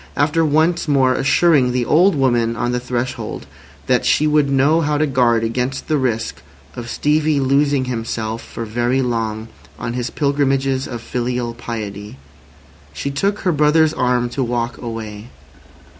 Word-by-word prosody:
After 150 +3 +2
once 160 +3 +1
more 135 -3 +3
assuring 135 -1 +3
the 125 -1 0
old 175 +7 +4
woman 120 -4 +1
on 120 +1 -1
the 125 - -1
threshold 125 - -4 0.4
that - - +2
she 155 - +2
would 150 -2 +2
know 140 +4 +3
how 150 -1 0
to 155 - +2
guard 120 -5 +2
against 125 +3 -2
the 155 - +1
risk 120 -4 -2 0.3
of 115 -1 -7
Stevie 150 +1 +1
losing 140 0 +2
himself 115 -2 -3
for 115 - -7
very 120 +4 0
long 110 -2 -2 0.3
on 115 - -4
his 125 -1 -3
pilgrimages 135 -2 0
of 120 -2 -6
filial 125 -1 -2
piety, 105 - -7 0.8
she 140 - -4
took 200 +9 -1
her 185 - +1
brother's 155 +1 +3
arm 125 -4 +1
to 135 +2 -2
walk 120 0 -2
away. 115 -1 -7
130 Hz, 155 wpm, -19 LUFS, 120-145 Hz, 0.8 s, old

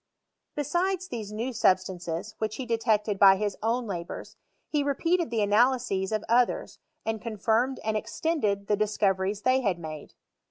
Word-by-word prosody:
Besides 365 +6 0
these 220 - -6
new 230 +5 -3
substances, 185 -2 0
which 220 -1 -2
he 260 - -5
detected 220 -3 +1
by 195 -1 +8
his 205 0 -2
own 235 +3 0
labours, 175 -5 -6 0.3
he 295 - 0
repealed 330 +4 +1
the 225 -2 +1
analyses 210 -2 +2
of 215 -1 -1
others, 245 - +1 0.3
and 225 -1 -2
confirmed 230 +3 0
and 220 0 -1
extended 215 -4 -1
the 210 - +2
discoreries 200 -1 0
they 255 +1 +3
had 195 -7 0
made. 155 -3 -8
220 Hz, 150 wpm, -27 LUFS, 200-255 Hz, 0.3 s, by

